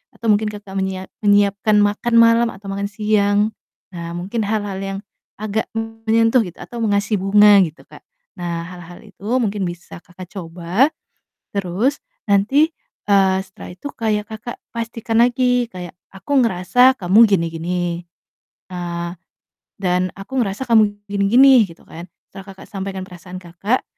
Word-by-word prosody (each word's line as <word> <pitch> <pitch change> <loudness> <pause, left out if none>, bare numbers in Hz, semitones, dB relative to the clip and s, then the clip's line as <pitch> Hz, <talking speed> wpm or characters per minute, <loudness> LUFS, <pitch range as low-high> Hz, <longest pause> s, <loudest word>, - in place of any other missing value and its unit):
atau 235 - -6
mungkin 210 +1 +2
Kakak 205 -2 -10
menyia 190 0 -3 0.2
menyiapkan 205 +1 +3
makan 210 +3 0
malam 230 0 +6
atau 195 +1 -12
makan 200 +1 -2
siang. 210 0 +1 0.4
Nah, 170 -1 -6
mungkin 200 +6 -3
hal-hal 205 -2 -2
yang 195 0 -4 0.4
agak 215 +1 -2
menyentuh 225 +1 +1
gitu 175 - -10
atau 240 - -9
mengasih 205 0 +1
bunga 205 +1 +6
gitu, 160 -1 -10
Kak. - - -15 0.4
Nah, 170 -1 -3
hal-hal 175 -1 -11
itu 205 -1 -15 0.2
mungkin 205 -3 -1
bisa 175 0 -7
Kakak 180 +2 -12
coba. 180 - 0 0.7
Terus 200 +9 0 0.3
nanti, 220 +10 +3 0.4
eee, 195 -2 +4
setelah 190 -1 -10
itu 185 +10 -8
kayak 210 -2 -2
Kakak 220 +2 -8
pastikan 230 0 0
lagi 245 0 +2
kayak, 180 -2 -8 0.2
"Aku 280 +9 -3
ngerasa 230 +6 +4
kamu 185 +3 +3
gini 195 -6 +2
gini, 170 +2 -3 0.9
eee, 170 -1 -4 0.7
dan 180 -1 0
aku 195 +7 -4
ngerasa 205 +1 -1
kamu 220 -4 +3 0.2
gini 200 -1 +1
gini," 265 +6 +7 0.2
gitu 165 - -16
kan. 170 +2 -10 0.2
Setelah 195 - -10
Kakak 190 - -13
sampaikan 195 -1 -5
perasaan 180 0 -10
Kakak, 185 +7 -2
200 Hz, 145 wpm, -20 LUFS, 185-225 Hz, 0.9 s, gini